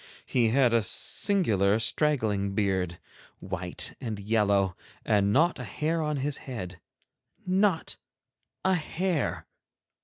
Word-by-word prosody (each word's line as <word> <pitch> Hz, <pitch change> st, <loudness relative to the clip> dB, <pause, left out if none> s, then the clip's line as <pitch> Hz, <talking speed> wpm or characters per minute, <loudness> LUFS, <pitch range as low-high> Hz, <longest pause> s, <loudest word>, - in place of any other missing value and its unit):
He 120 Hz, -3 st, +2 dB
had 125 Hz, 0 st, +3 dB
a 115 Hz, -, +4 dB
singular 110 Hz, -, +1 dB
straggling 110 Hz, -6 st, 0 dB
beard, 95 Hz, -4 st, 0 dB, 0.4 s
white 90 Hz, -1 st, -3 dB
and 110 Hz, -5 st, -4 dB
yellow, 100 Hz, -3 st, +1 dB, 0.3 s
and 100 Hz, -1 st, +2 dB
not 165 Hz, +9 st, +3 dB
a -, -, -4 dB
hair 160 Hz, +2 st, -1 dB
on 150 Hz, -1 st, -1 dB
his 140 Hz, +1 st, -2 dB
head—not 140 Hz, -, -3 dB, 0.7 s
a 190 Hz, -, +4 dB
hair! 175 Hz, -1 st, -1 dB
115 Hz, 110 wpm, -28 LUFS, 100-150 Hz, 0.7 s, a